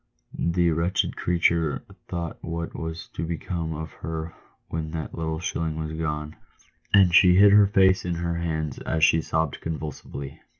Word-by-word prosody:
The 85 0 +1
wretched 85 +4 0
creature 85 -3 +1 0.2
thought 85 -2 -4
what 85 0 -4
was 80 0 -5
to 80 - -5
become 85 -1 -3
of 80 +1 -6
her 80 0 -4 0.3
when 80 -1 -4
that 80 -2 -4
little 80 -1 -3
shilling 80 -2 -2
was 80 0 -4
gone, 75 -1 -3 0.5
and 95 -4 +6
she 90 0 +7
hid 100 +2 +7
her 105 -1 +7
face 95 -1 +4
in 90 -1 -2
her 85 0 -2
hands 80 -4 -2
as 80 -1 -1
she 80 +1 +5
sobbed 80 -1 -1
convulsively. 75 -3 -6
80 Hz, 160 wpm, -25 LUFS, 80-85 Hz, 0.5 s, she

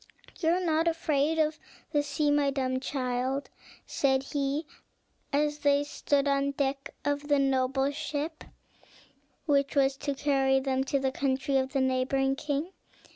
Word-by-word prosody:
"You 325 - +1
are 350 +2 +3
not 325 0 +2
afraid 320 -2 +1
of 310 -1 +1 0.3
the 295 - +2
sea, 290 +1 0
my 290 -1 +3
dumb 260 -2 -1
child," 260 0 -2 0.3
said 265 -1 +1
he, 280 +2 -2 0.7
as 295 +1 +1
they 285 0 +3
stood 285 -1 0
on 275 0 +2
the - - 0
deck 275 0 -2 0.2
of 290 0 -1
the 290 -1 +3
noble 270 0 +1
ship 310 +2 -4 1.0
which 280 -2 +2
was 270 -1 +3
to 285 0 -3
carry 270 -1 +2
them 265 0 0
to 275 - +1
the 265 -1 0
country 270 0 -1
of 265 +1 -1
the 270 - +2
neighboring 260 +1 +1
king. 295 +4 -2
280 Hz, 155 wpm, -29 LUFS, 270-290 Hz, 1.0 s, are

